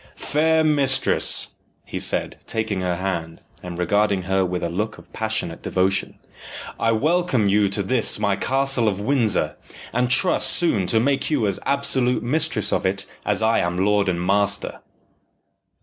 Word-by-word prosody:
"Fair 160 +2 +1
mistress," 140 -4 +2 0.4
he - - -6
said, - - 0
taking 110 -4 -2
her 90 -1 -1
hand, 85 -3 -4 0.2
and 90 -1 -7
regarding 100 +2 +1
her 95 +1 0
with 90 -1 -3
a 85 - -1
look 105 +5 -3
of - - -18
passionate 110 -6 -3
devotion, 95 +1 -1 0.6
"I 115 - +2
welcome 155 - +1
you 100 0 +2
to 100 +1 -2
this 120 +3 +2
my 100 -2 0
castle 135 +2 +1
of 100 -2 -1
Windsor, 105 - 0 0.4
and 125 +1 0
trust 155 +8 +3
soon 110 - +2
to 110 - +2
make 140 +3 0
you 145 -8 +1
as 100 -2 -1
absolute 130 -3 +1
mistress 150 +7 0
of - - 0
it 100 +1 -1 0.2
as - - +1
I 110 +1 +2
am 85 +2 -1
lord 105 -1 +2
and 85 -1 -1
master." 100 +2 0
105 Hz, 160 wpm, -22 LUFS, 95-130 Hz, 0.6 s, trust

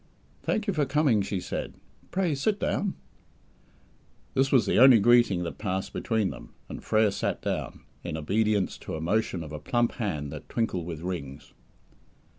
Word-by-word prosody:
"Thank 215 - -1
you 200 - 0
for 150 -5 +1
coming," 140 -6 +3
she 100 -1 -2
said. - - -5 0.3
"Pray, 185 -4 0
sit 200 +10 0
down." 200 -2 -1 1.4
This 135 0 +2
was 130 -4 +5
the - - +2
only 130 -1 +9
greeting 120 -5 +4
that 85 - -6
passed 95 -2 -3
between 110 -5 0
them, - - -12
and - - -8
Frere 110 -1 +3
sat - - -2
down, - - -3 0.2
in 85 -2 -4
obedience 105 +5 0
to - - -6
a - - -4
motion 90 +1 0
of 75 - -9
a 75 - -5
plump 120 +10 +1
hand 75 - -3
that 75 -1 -9
twinkled 95 -8 -1
with 80 -3 -6
rings. 85 -7 -6
105 Hz, 170 wpm, -27 LUFS, 85-130 Hz, 1.4 s, only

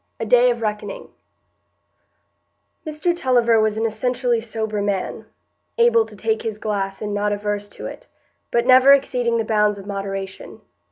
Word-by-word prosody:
A 225 - -2
Day 245 +2 +5
of 235 -1 -2
Reckoning 215 - -4 1.8
Mr 310 +3 -1
Tulliver 240 -7 +3
was 215 0 0
an 225 - 0
essentially 240 +1 0
sober 220 -2 -3
man,—able 450 - -1
to - - -13
take 445 -1 -1
his 220 -2 -4
glass 200 -2 -3
and 210 -1 -3
not 205 0 0
averse 205 0 -3
to - - -10
it, - - -9 0.4
but 235 0 +1
never 260 +2 +7
exceeding 245 -4 +1
the 225 - -1
bounds 210 -1 +2
of 195 - -10
moderation. 195 -1 -6
225 Hz, 150 wpm, -21 LUFS, 205-250 Hz, 1.8 s, never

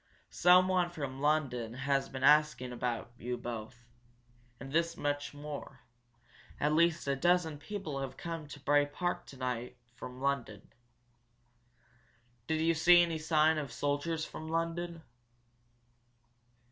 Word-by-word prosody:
Someone 180 0 +4
from 140 -5 -6
London 130 -6 0
has 135 0 0
been 130 0 -6
asking 150 -4 +4
about 120 -1 -3
you 125 +1 -3
both. 120 0 -7 0.7
And 135 +1 -8
this 170 +1 +1
much 145 0 -2
more 145 0 -8 0.8
at 150 +1 +2
least 170 -1 +2
a 140 - +2
dozen 165 0 +2
people 160 -7 -5
have 135 -1 -5
come 170 -3 -4
down 150 - -12
to 145 - -9
Bray 145 +1 +3
Park 175 +5 -3
today 125 -2 -4 0.2
from 125 +1 -9
London." 130 -7 -3 1.7
"Did 160 0 0
you 165 +1 +3
see 175 +2 +6
any 165 -2 -2
sign 155 0 +3
of 145 -2 -5
soldiers 150 +3 -1
from 160 - -8
London?" 165 +1 -2
150 Hz, 130 wpm, -32 LUFS, 135-165 Hz, 1.7 s, see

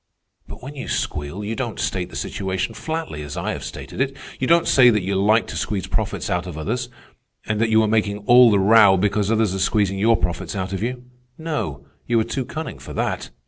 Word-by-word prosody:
"But - - -10
when 140 +3 -7
you 135 - -6
squeal 75 +7 -3
you 110 +2 -3
don't 120 -3 -4
state 90 -1 -2
the - - -12
situation 95 +3 -3
flatly, 160 - -4
as 75 -1 -7
I - - -2
have - - -5
stated - - -6
it. 135 0 -1 0.2
You 130 - 0
don't 170 0 +4
say 125 -2 +6
that 105 -5 +1
you 95 +2 -2
like 105 +4 +3
to - - -8
squeeze 100 -4 -2
profits - - -2
out 90 0 -1
of 85 -4 -7
others, 115 +10 -3 0.6
and 105 +1 -1
that 115 - +2
you 110 0 +4
are - - +1
making 105 -1 +1
all 125 +1 +8
the 105 - +3
row 100 0 +6
because 100 +2 +1
others 110 -4 +2
are 95 - -3
squeezing 95 0 +1
your 115 +3 +4
profits 85 -1 -3
out 95 0 -3
of 95 - -3
you. 125 +2 -3 0.3
No, 150 - -4 0.2
you 120 -1 +3
are - - +2
too 125 +3 -3
cunning 160 +5 -6
for - - -9
that. - - -2
105 Hz, 225 wpm, -22 LUFS, 95-120 Hz, 0.6 s, all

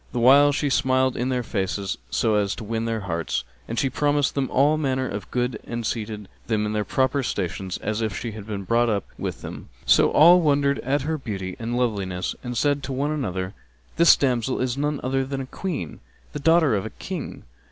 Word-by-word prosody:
The 125 - -1
while 140 +4 +7
she 145 0 -1
smiled 130 -1 +2
in 125 +2 -1
their 125 -1 0
faces 95 -2 -2
so 110 - +1
as 100 -2 +1
to 115 - -7
win 115 +1 -2
their 115 -1 -2
hearts; 85 -7 -2 0.2
and 115 - -4
she 135 - +2
promised 145 +1 +1
them 135 -2 -1
all 145 +4 +3
manner 130 -4 0
of 100 -4 -6
good 125 -2 -1
and 120 -1 -5
seated 105 -3 -4 0.2
them 110 -2 +1
in 105 - -2
their 105 -1 0
proper 130 +4 +1
stations, 95 -5 -3
as 110 +1 -1
if 110 -5 -2
she 115 0 -4
had 105 -1 -9
been 100 -2 -4
brought 115 +4 +2
up 100 -3 0
with - - -4
them; - - -8 0.2
so - - +5
all 175 +4 +7
wondered 140 -2 +2
at 135 +2 0
her 160 +1 -2
beauty 95 -7 -5
and 120 +1 -2
loveliness 100 -7 -1
and 125 -1 -4
said 145 +1 +2
to 135 +1 -5
one 140 +3 -1
another, 95 -10 -3 0.4
"This 170 -1 +8
damsel 125 -2 0
is 130 -1 0
none 145 0 -1
other 135 +1 0
than 135 0 -4
a - - -5
Queen, 145 - -5 0.3
the 150 - -4
daughter 160 -4 +4
of 100 - -1
a 110 - -5
King." 175 - -7
125 Hz, 215 wpm, -24 LUFS, 105-140 Hz, 0.4 s, This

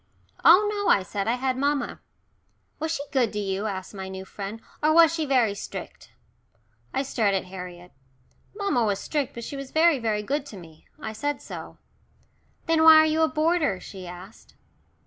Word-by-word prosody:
"Oh 380 +5 +7
no," 410 -1 -1
I 195 - +4
said. 200 +2 -4
"I 235 - +2
had 255 0 -1
mamma." 285 +1 -1 0.8
"Was 315 +1 -2
she 305 -3 -2
good 250 -5 +2
to 210 - -2
you," 195 +1 -2
asked 190 -1 -5
my 190 -1 -6
new 190 0 -7
friend, 200 +3 -7 0.2
"or 310 +1 +3
was 330 -1 +7
she 320 -2 -2
very 245 -6 +3
strict?" 200 - -8 0.8
I 270 - -1
stared 220 -7 +1
at 190 - -1
Harriet. 180 -1 -9 0.6
Mamma 395 - 0
was 205 -3 +1
strict, 290 +2 -2
but 235 - -6
she 280 - -6
was 275 -1 -7
very, 320 -2 +4
very 215 -3 -1
good 280 +5 -1
to 215 - -10
me. 160 -3 -15
I 220 -6 -5
said 290 +5 -2
so. - - -9 0.9
"Then 325 -1 +2
why 320 0 +9
are 315 0 +7
you 315 +1 +1
a 320 - +5
boarder?" 310 - +1
she 185 -2 -10
asked. 180 +4 -12
245 Hz, 185 wpm, -25 LUFS, 195-310 Hz, 0.9 s, why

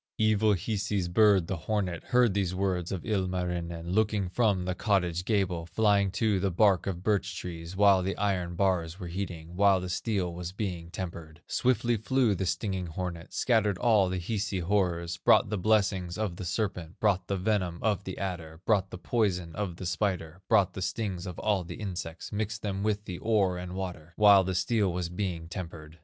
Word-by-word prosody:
"Evil 110 -1 +3
Hisi's 100 -1 -1
bird, 100 0 +4
the 95 - -2
hornet, 90 -1 -2
Heard 125 -4 +3
these 95 -2 0
words 90 -3 -1
of 95 -3 -4
Ilmarinen, 90 -4 -2
Looking 105 -2 +1
from 100 -3 +1
the 90 - -1
cottage 90 -3 0
gable, 95 -6 0
Flying 100 0 +3
to 110 -4 +1
the 100 +1 +1
bark 95 0 +3
of 90 -2 -3
birch 95 -3 0
trees, 85 0 -6
While 100 -1 +5
the 95 +2 -2
iron 90 -4 -1
bars 90 -2 0
were 90 -3 -6
heating, 85 -2 -5
While 100 0 +4
the 90 0 -5
steel 90 -2 -1
was 90 0 -6
being 90 -5 -4
tempered; 85 -3 -7
Swiftly 120 -2 +1
flew 120 0 +2
the 95 -1 -2
stinging 90 0 -2
hornet, 85 0 -5
Scattered 110 -6 +2
all 105 -5 +3
the 95 - -2
Hisi 100 +2 -2
horrors, 85 -2 0
Brought 95 - +4
the 105 - 0
blessing 100 -3 +2
of 105 -5 -2
the 95 - -5
serpent, 90 -2 -3
Brought 100 -4 +1
the 100 - -1
venom 90 -3 0
of 105 -3 +1
the 95 - -6
adder, 85 -4 -5
Brought 100 -4 +2
the - - -7
poison 90 -5 0
of 100 -3 -3
the 90 - -7
spider, 90 0 -2
Brought 100 -5 +4
the 95 - -6
stings 95 -2 -3
of 90 - -6
all 105 -4 +1
the 85 - -7
insects, 90 -5 -6
Mixed 105 0 -3
them 100 -2 -2
with 105 0 -1
the 90 -1 -6
ore 100 -5 +1
and 90 0 -6
water, 90 -3 -6
While 100 -2 +7
the 95 0 -2
steel 105 0 +1
was 85 -1 -3
being 90 -3 -3
tempered. 85 -2 -8
95 Hz, 190 wpm, -29 LUFS, 90-105 Hz, -, While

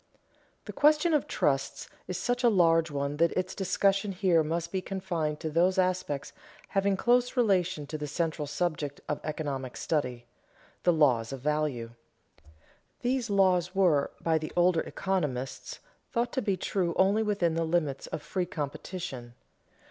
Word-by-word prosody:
_ - - -43
The - - -7
question 305 +3 +4
of 295 - +2
trusts 135 -1 -1 0.2
is 180 - -3
such 245 +1 -1
a 240 - +6
large 165 -5 +4
one 140 0 -2
that 170 +1 +3
its 185 +1 -2
discussion 195 +1 +1
here 180 -3 +3
must 170 +2 -2
be 190 - -1
confined 175 -6 -3
to 160 -2 -3
those 180 +4 +3
aspects 180 -6 -1 0.4
having 195 -1 +1
close 245 +3 +2
relation 185 -9 +2
to 155 +2 -6
the 150 - -4
central 155 0 -2
subject 150 -2 -2
of 150 - -2
economic 140 -5 -4
study, 125 -6 -2 0.6
the 175 - +4
laws 130 -8 +3
of 135 -2 -6
value. 150 -5 -1 1.1
These 245 -1 0
laws 185 -2 +2
were 170 -8 +3
by 160 -1 +1
the 155 - -6
older 175 -1 +4
economists 135 -9 -3 0.3
thought 240 -1 -1
to 260 - 0
be 200 -4 0
true 180 -1 -1
only 195 +3 +3
within 200 -6 +1
the 165 0 0
limits 160 -5 -1
of 150 - -5
free 185 -2 -2
competition. 145 -5 -6
170 Hz, 155 wpm, -29 LUFS, 150-195 Hz, 1.1 s, a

